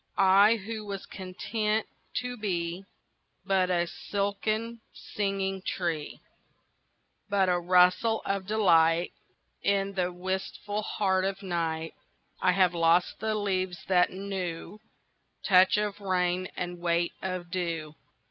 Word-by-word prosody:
I 195 +3 +6
who 220 +1 -6
was 200 -2 -6
content 210 +3 -2 0.4
to 250 0 -5
beBut 185 -1 -3
a 175 -1 +2
silken 215 +5 -2 0.3
singing 195 -2 -1
tree, 170 -5 -3 1.1
But 195 -2 +2
a 175 -1 +2
rustle 180 +5 +3
of 195 -1 -2
delightIn 195 +1 +1
the 180 -2 0
wistful 190 +3 -3
heart 190 -3 0
of 195 +1 -2
night,I 165 0 -3
have 185 -1 +3
lost 170 +1 +2
the 220 0 -1
leaves 185 -3 -2
that 180 -1 +4
knewTouch 190 0 -1
of 210 -1 -2
rain 185 -1 0
and 175 -1 -4
weight 170 0 0
of 185 -2 -4
dew. 165 -4 -3
190 Hz, 105 wpm, -28 LUFS, 175-200 Hz, 1.1 s, I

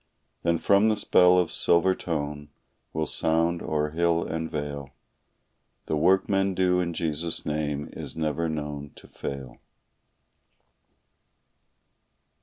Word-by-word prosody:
Then 85 -1 +2
from 100 +5 +4
this 105 -1 -1
bell 90 0 +5
of 90 -2 +2
silver 85 +2 +3
tone 75 -4 -4 0.4
will 80 0 -1
sound 85 +3 +1
o'er 75 -1 -1
hill 85 +1 +1
and 80 0 -3
vale: 70 -2 -4 1.0
"The - - -1
work 95 +5 +3
men 95 -1 +1
do 90 0 +2
in 85 -2 -2
Jesus' 80 0 -2
name 75 -1 -2
is - - -8
never 80 +1 -1
known 75 -2 -5
to - - -15
fail." 65 -3 -7
80 Hz, 120 wpm, -26 LUFS, 75-90 Hz, 1.0 s, bell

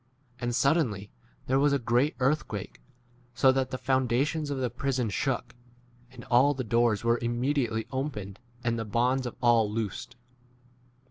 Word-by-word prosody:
And 120 -1 -2
suddenly 125 - +1 0.3
there 130 +1 +2
was 145 0 +3
a - - +3
great 125 +4 +1
earthquake, 130 -7 -2 0.5
so 130 +3 +5
that 130 -1 0
the 130 - -4
foundations 130 +4 0
of 140 - -2
the 125 -3 -1
prison 130 -5 -1
shook, 125 +2 -2 0.6
and 120 -2 -12
all 130 +4 +3
the 130 - -3
doors 115 -2 +1
were 115 0 +2
immedi 120 +2 0
ately 110 0 -3
opened, 110 -8 -4 0.2
and 115 -1 0
the - - -2
bonds 125 +4 +1
of 120 - -7
all 120 -3 +4
2 105 - -6
' - - -5
loosed. 110 0 -4
125 Hz, 165 wpm, -28 LUFS, 115-135 Hz, 0.6 s, so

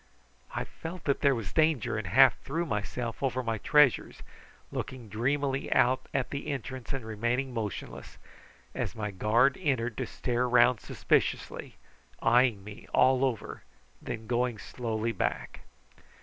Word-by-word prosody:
I - - -1
felt 170 +2 -8
that 140 - 0
there 140 -2 +4
was 115 -5 -5
danger, 155 -9 +2
and 105 -3 -3
half 130 +4 +6
threw 165 +5 -3
myself 115 -1 -3
over 130 -2 0
my 115 -2 -2
treasures, 150 -2 +3 0.5
looking 125 -4 -5
dreamily 135 +5 -1
out 130 +2 +3
at 135 -2 -1
the 140 +1 -4
entrance 130 -3 -5
and 135 -4 -4
remaining 120 +4 -1
motionless, 110 -4 -5 0.6
as - - -3
my 105 -2 -3
guard 115 +8 +3
entered 125 -8 0
to - - -2
stare 125 0 -1
round 125 -1 +5
suspiciously, - - -1 0.4
eyeing 120 -4 +3
me 105 +2 -11
all 130 +1 +4
over, 125 -6 -2 0.4
and - - -17
then 110 - -4
going 120 0 0
slowly 115 0 -3
back. 100 - -3
125 Hz, 145 wpm, -29 LUFS, 110-135 Hz, 0.6 s, half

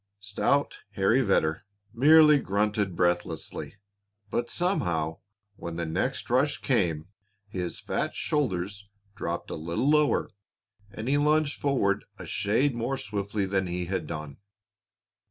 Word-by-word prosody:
Stout 105 +8 0
Harry 100 +7 +3
Vedder 95 -7 +1 0.3
merely 150 +4 +7
grunted 105 -3 0
breathlessly. 85 -2 -1 0.6
But 120 0 -1
somehow, 85 - 0 0.4
when 85 -1 -6
the 85 0 -2
next 80 - -2
rush 140 +4 +2
came, 85 - +1 0.4
his 90 -4 -4
fat - - -2
shoulders 100 - -2 0.2
dropped 85 -4 -4
a - - -3
little 85 - -2
lower 150 -1 +3 0.6
and 110 +3 -7
he 145 +2 +3
lunged 150 0 +2
forward 105 -8 +1
a - - -8
shade 125 +8 +1
more 120 +3 -2
swiftly 100 -1 -2
than 95 -1 0
he 90 0 -3
had 95 0 -3
done. 75 -2 -6
100 Hz, 125 wpm, -27 LUFS, 90-135 Hz, 0.6 s, merely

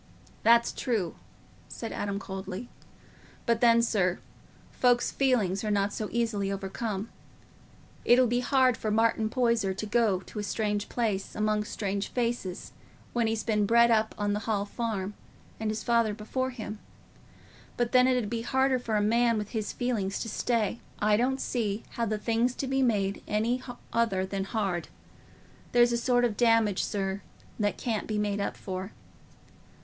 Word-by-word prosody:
"That's 235 +1 +5
true," 215 -10 -1 0.6
said 225 - -6
Adam 200 -1 -2
coldly. 190 +3 -6 0.8
"But 235 -1 +1
then, 235 -1 +6
sir, 190 -6 +1 0.5
folks's 245 -1 +2
feelings 220 -8 +1
are 215 - -1
not 205 0 +1
so 215 - -3
easily 220 -4 0
overcome. 200 +2 -3 0.9
It'll 250 +1 +6
be 245 +1 +1
hard 255 -1 +3
for 215 - -2
Martin 220 0 +2
Poyser 230 -6 +1
to 210 - -4
go 210 -4 +2
to 210 - -8
a - - -2
strange 205 +1 -1
place, 215 -5 -2
among 215 0 +1
strange 200 -2 -2
faces, 235 -7 -3 0.4
when 235 -2 +2
he's 220 0 -1
been 210 -3 +1
bred 235 +1 +5
up 220 -1 +2
on 205 -1 0
the 210 - -1
Hall 205 -2 +1
Farm, 210 -3 -3 0.5
and 220 -1 -1
his 215 0 -3
father 230 -3 +2
before 255 +5 -2
him; 220 -4 -7 1.0
but 240 -1 0
then 255 0 +6
it 255 -1 +3
'ud 235 -4 -1
be 230 +2 -2
harder 265 +1 +2
for 230 -3 -2
a 210 - +2
man 230 +1 +3
with 210 -1 -3
his 215 -2 -3
feelings 215 -6 -1
to - - -3
stay. 230 -1 0 0.2
I 210 0 +3
don't 260 +4 +1
see 220 -5 -2
how 230 -1 -1
the 215 0 -1
thing's 230 +3 +1
to - - -3
be 270 0 0
made 205 -6 +1
any 230 +4 0 0.3
other 225 -5 +1
than 195 0 -3
hard. 195 -5 -2 0.9
There's 240 0 +5
a - - +2
sort 245 0 +2
o' - - +2
damage, 225 -2 +3
sir, 195 -1 -2 0.4
that 205 -3 0
can't 225 -4 -2
be 215 - -1
made 205 -1 0
up - - -3
for." 190 +1 -5
220 Hz, 165 wpm, -28 LUFS, 205-235 Hz, 1.0 s, then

